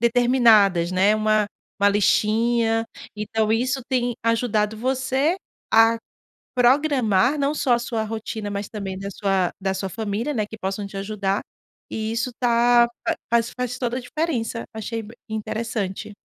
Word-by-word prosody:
determinadas, 230 Hz, -7 st, +4 dB
né? 190 Hz, +3 st, +3 dB
Uma 215 Hz, -1 st, +2 dB, 0.3 s
uma 200 Hz, -, +6 dB
listinha. 225 Hz, +3 st, +2 dB, 0.3 s
Então 215 Hz, +1 st, -1 dB
isso 250 Hz, +4 st, +1 dB
tem 245 Hz, -2 st, 0 dB
ajudado 220 Hz, -2 st, +1 dB
você 265 Hz, -, 0 dB, 0.4 s
a 225 Hz, +1 st, +6 dB, 0.6 s
programar 255 Hz, -2 st, +3 dB
não 285 Hz, +1 st, +1 dB
só 275 Hz, -4 st, +1 dB
a -, -, +1 dB
sua 235 Hz, -2 st, -2 dB
rotina, 220 Hz, -1 st, -5 dB
mas 200 Hz, 0 st, -4 dB
também 195 Hz, -3 st, -5 dB
da 195 Hz, -, -5 dB
sua 190 Hz, -3 st, 0 dB
da 190 Hz, 0 st, 0 dB
sua 195 Hz, 0 st, -3 dB
família, 220 Hz, -, -3 dB
né, 215 Hz, -, 0 dB
que 220 Hz, -, -10 dB
possam 195 Hz, +1 st, -3 dB
te 195 Hz, -, -10 dB
ajudar 195 Hz, 0 st, -1 dB, 0.5 s
e 220 Hz, 0 st, -3 dB
isso 230 Hz, +2 st, -1 dB
tá 240 Hz, 0 st, +4 dB, 0.2 s
fa -, -, +2 dB, 0.2 s
faz 235 Hz, 0 st, +2 dB
faz 250 Hz, -1 st, -2 dB
toda 245 Hz, -1 st, -2 dB
a -, -, -4 dB
diferença. 245 Hz, -4 st, -2 dB
Achei 225 Hz, +1 st, -4 dB
b 220 Hz, +2 st, -12 dB
interessante. 215 Hz, -2 st, -4 dB
225 Hz, 150 wpm, -23 LUFS, 205-245 Hz, 0.6 s, uma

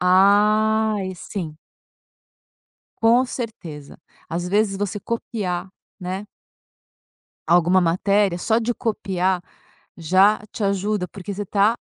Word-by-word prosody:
Ai 210 Hz, +2 st, +3 dB
sim 170 Hz, -4 st, -6 dB, 1.4 s
com 235 Hz, +3 st, +4 dB
certeza, 175 Hz, -, -7 dB, 0.3 s
às 175 Hz, +2 st, -3 dB
vezes 205 Hz, 0 st, +1 dB
você 205 Hz, 0 st, -3 dB
copiar, 190 Hz, -5 st, -3 dB, 0.3 s
né 190 Hz, +3 st, -5 dB, 1.2 s
alguma 175 Hz, +2 st, +4 dB
matéria, 185 Hz, +2 st, +2 dB
só 220 Hz, +5 st, +2 dB
de 235 Hz, +1 st, -1 dB
copiar 190 Hz, -6 st, -1 dB, 0.5 s
já 185 Hz, +6 st, +4 dB
te 215 Hz, -, -5 dB
ajuda, 200 Hz, -1 st, 0 dB
porque 200 Hz, 0 st, -7 dB
você 205 Hz, -, -4 dB
está 205 Hz, +3 st, +2 dB
195 Hz, 100 wpm, -22 LUFS, 180-215 Hz, 1.4 s, com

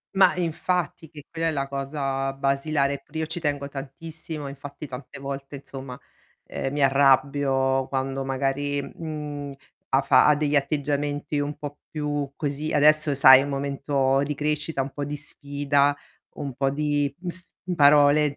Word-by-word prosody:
Ma 190 Hz, -2 st, +5 dB
infatti, 175 Hz, -1 st, -2 dB
che 150 Hz, -2 st, -12 dB
quella 165 Hz, 0 st, -2 dB
è -, -, 0 dB
la 140 Hz, -2 st, -2 dB
cosa 135 Hz, -1 st, -2 dB
basilare. 140 Hz, +1 st, 0 dB
Pure 160 Hz, -, -6 dB
io 160 Hz, -, 0 dB
ci 165 Hz, +2 st, -4 dB
tengo 145 Hz, -3 st, -2 dB
tantissimo, 150 Hz, +2 st, -7 dB
infatti 140 Hz, +2 st, -8 dB
tante 125 Hz, 0 st, -9 dB
volte 140 Hz, +1 st, -6 dB
insomma, 135 Hz, -2 st, -9 dB, 0.5 s
ehm, 135 Hz, -, -4 dB
mi 145 Hz, -, -1 dB
arrabbio 135 Hz, -1 st, +3 dB
quando 135 Hz, 0 st, -2 dB
magari, 140 Hz, +2 st, -1 dB
mhmm, 145 Hz, -1 st, -6 dB, 0.4 s
ha 135 Hz, -, +3 dB
fa 130 Hz, -2 st, +5 dB
ha 150 Hz, -, +6 dB
degli 150 Hz, 0 st, 0 dB
atteggiamenti 145 Hz, +1 st, -1 dB
un 145 Hz, 0 st, -2 dB
po' 145 Hz, 0 st, -7 dB
più 145 Hz, -2 st, -3 dB
così, 150 Hz, +1 st, -3 dB
adesso 155 Hz, 0 st, +5 dB
sai 130 Hz, -1 st, +9 dB
è -, -, -1 dB
un 145 Hz, -, -5 dB
momento 140 Hz, -1 st, 0 dB
di 150 Hz, -, -2 dB
crescita, 150 Hz, 0 st, -1 dB
un 135 Hz, +1 st, -4 dB
po' 145 Hz, -1 st, -4 dB
di 150 Hz, -, -4 dB
sfida, 145 Hz, 0 st, 0 dB, 0.4 s
un 140 Hz, -2 st, -4 dB
po' 135 Hz, -1 st, +1 dB
di, 145 Hz, -1 st, 0 dB
mhmm, 180 Hz, 0 st, -5 dB
s 185 Hz, +1 st, -3 dB, 0.2 s
mhmm, 180 Hz, -1 st, -2 dB
parole 145 Hz, 0 st, +5 dB
145 Hz, 165 wpm, -25 LUFS, 135-150 Hz, 0.5 s, sai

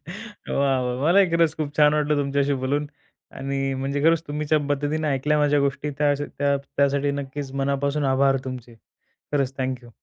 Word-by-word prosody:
वाह! 175 Hz, -, -2 dB
वाह! 125 Hz, 0 st, -2 dB
मलाही 185 Hz, +5 st, +5 dB
खरंच 165 Hz, -2 st, +3 dB
खूप 145 Hz, -1 st, -2 dB
छान 150 Hz, 0 st, +5 dB
वाटलं 150 Hz, 0 st, +1 dB
तुमच्याशी 140 Hz, 0 st, 0 dB
बोलून 145 Hz, +3 st, 0 dB, 0.5 s
आणि 140 Hz, 0 st, -2 dB, 0.2 s
म्हणजे 140 Hz, +1 st, -2 dB
खरंच 165 Hz, 0 st, +4 dB
तुम्ही 150 Hz, +1 st, -3 dB
ज्या 155 Hz, -, +6 dB
पद्धतीने 150 Hz, +2 st, -1 dB
ऐकल्या 145 Hz, +2 st, +1 dB
माझ्या 145 Hz, -1 st, +3 dB
गोष्टी 140 Hz, +2 st, -3 dB
त्या 145 Hz, -1 st, +3 dB, 0.3 s
त्या 140 Hz, 0 st, +2 dB
त्यासाठी 140 Hz, 0 st, 0 dB
नक्कीच 135 Hz, 0 st, -6 dB
मनापासून 140 Hz, +1 st, 0 dB
आभार 135 Hz, 0 st, +3 dB
तुमचे. 125 Hz, -3 st, -7 dB, 0.6 s
खरंच 135 Hz, -2 st, 0 dB
थँक 130 Hz, -1 st, -2 dB
यू. 120 Hz, -, -15 dB
140 Hz, 170 wpm, -24 LUFS, 135-150 Hz, 0.6 s, ज्या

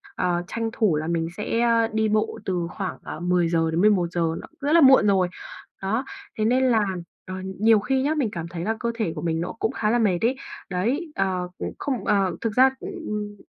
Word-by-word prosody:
ờ, 175 Hz, -1 st, 0 dB
tranh 230 Hz, +2 st, -2 dB
thủ 210 Hz, -9 st, +2 dB
là 155 Hz, +1 st, -2 dB
mình 165 Hz, -1 st, 0 dB
sẽ 230 Hz, +2 st, -1 dB, 0.3 s
đi 220 Hz, 0 st, +1 dB
bộ 215 Hz, +1 st, 0 dB
từ 175 Hz, -3 st, -1 dB
khoảng, 195 Hz, -2 st, -4 dB
ờ, -, -, -7 dB
10:00-11:00, 175 Hz, +1 st, +2 dB, 0.2 s
nó -, -, -10 dB
rất 285 Hz, +1 st, 0 dB
là 335 Hz, -, +7 dB
muộn 265 Hz, -6 st, +7 dB
rồi. 190 Hz, -3 st, +3 dB, 0.5 s
Đó, 220 Hz, +7 st, -1 dB, 0.3 s
thế 215 Hz, -, +1 dB
nên 255 Hz, +2 st, +3 dB
à, 220 Hz, -2 st, +3 dB, 0.4 s
ờ, 185 Hz, -, -6 dB, 0.2 s
nhiều 220 Hz, 0 st, +5 dB
khi 260 Hz, +6 st, 0 dB
nhá, 290 Hz, +3 st, +1 dB
mình 275 Hz, -7 st, 0 dB
cảm 170 Hz, -3 st, -5 dB
thấy 170 Hz, 0 st, -6 dB
là 220 Hz, +4 st, 0 dB
cơ 235 Hz, -, -1 dB
thể 220 Hz, -8 st, -1 dB
của -, -, -5 dB
mình 165 Hz, -1 st, -1 dB
nó 175 Hz, -, -3 dB
cũng 220 Hz, -, 0 dB
khá 210 Hz, -, -1 dB
là 240 Hz, +2 st, +2 dB
mệt 200 Hz, -6 st, +2 dB
ấy. 240 Hz, +4 st, +2 dB, 0.3 s
Đấy, 245 Hz, -, -1 dB
ờ, 185 Hz, -2 st, -1 dB, 0.3 s
không 270 Hz, -4 st, -2 dB
ờ, 195 Hz, -3 st, +2 dB
thực 225 Hz, -2 st, -1 dB
ra, 260 Hz, +1 st, +7 dB
ừm 210 Hz, -, -5 dB
210 Hz, 205 wpm, -24 LUFS, 180-235 Hz, 0.5 s, là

